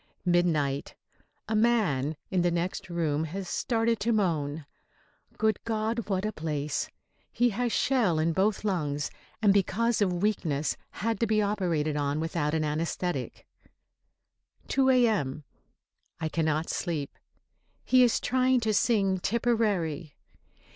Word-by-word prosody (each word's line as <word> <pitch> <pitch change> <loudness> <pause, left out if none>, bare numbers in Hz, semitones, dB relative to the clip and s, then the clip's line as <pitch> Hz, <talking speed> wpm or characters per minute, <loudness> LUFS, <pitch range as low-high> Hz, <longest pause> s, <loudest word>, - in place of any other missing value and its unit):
Midnight. 160 -6 +1 0.5
A 220 - -1
man 205 - +2 0.2
in 185 -2 +2
the 175 - +3
next 175 +2 -2
room 160 -3 0
has 185 +4 -5
started 230 +1 0
to 230 +3 0
moan. 160 -8 0 0.7
Good 220 -2 +1
God, 225 0 -2
what 190 0 0
a 215 - -1
place! 150 -4 -3 0.4
He 245 0 +2
has 240 +3 -1
shell 230 - +2
in 160 +1 +1
both 195 +4 +1
lungs, 150 -8 -1 0.3
and 200 -2 +6
because 215 +4 +1
of 180 -2 +1
weakness 160 -8 0
had 225 +1 -2
to 230 - +1
be 215 0 +2
operated 175 -8 0
on 145 +1 0
without 160 -1 -1
an 155 - +1
anæsthetic. 155 -1 -2 1.3
2 265 -1 +3
A.M. 215 - +2 0.8
I 160 -1 -2
cannot 155 0 0
sleep. 155 -5 -3 0.7
He 255 0 +5
is 245 -2 +4
trying 255 0 +2
to 220 -1 +1
sing 200 -4 +2
"Tipperary." 200 -9 0
185 Hz, 130 wpm, -28 LUFS, 155-220 Hz, 1.3 s, and